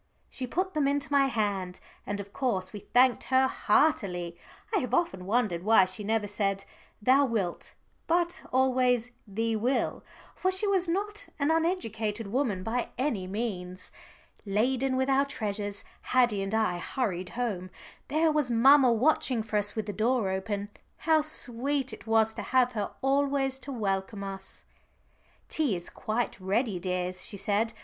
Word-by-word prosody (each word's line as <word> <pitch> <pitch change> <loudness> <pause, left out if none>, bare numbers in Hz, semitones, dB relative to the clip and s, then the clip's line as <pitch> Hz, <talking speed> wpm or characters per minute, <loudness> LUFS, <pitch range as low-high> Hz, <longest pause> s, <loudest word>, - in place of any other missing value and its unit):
She 255 - -5
put 370 +8 -1
them 300 -3 +1
into 285 0 -1
my 280 -1 +4
hand, 200 -7 -2 0.3
and 205 0 -3
of 200 0 -8
course 190 -9 -1
we 205 - -6
thanked 245 +5 +3
her 260 0 +4
heartily. 200 - +1 0.4
I - - +4
have 250 - -1
often 190 - -1
wondered 210 -6 +1
why 210 -1 +5
she 185 +3 -5
never 215 0 0
said, 195 -1 -1 0.3
"thou 260 +6 +4
wilt," 210 -8 -3 0.3
but 345 +1 +1
always 250 -2 +2 0.2
"thee 225 +3 -1
will," 245 +5 0 0.3
for 370 - 0
she 375 +3 +6
was 385 -3 +2
not 400 +3 -2
an 290 +2 +1
uneducated 230 - -1
woman 210 -3 -1
by 235 +4 -2
any 240 -9 -1
means. 185 -3 -5 0.5
Laden 255 +6 +1
with 260 0 +1
our 270 0 +4
treasures 205 -6 -4 0.2
Haddie 240 -6 +2
and 195 +2 -2
I 200 -6 +1
hurried 185 -3 -2
home. 200 -7 -2 0.4
There 315 +2 +2
was 300 -4 0
mamma 260 +2 +6
watching 245 -1 +2
for 215 -1 -2
us 205 0 -1
with 220 -2 -2
the 205 - -4
door 220 -1 +1
open. 200 +1 -3 0.3
How 320 -1 +3
sweet 275 -2 -2
it - - -11
was 225 0 +3
to - - -5
have 255 -1 +2
her 210 -4 -2
always 270 -1 +1
to 275 - -7
welcome 200 -3 -2
us! 195 -1 -8 0.8
"Tea 290 -10 0
is 175 0 -6
quite 235 -2 -2
ready, 195 +1 0
dears," 180 0 -2
she 200 - -3
said. 210 +3 0
225 Hz, 160 wpm, -28 LUFS, 200-270 Hz, 0.8 s, she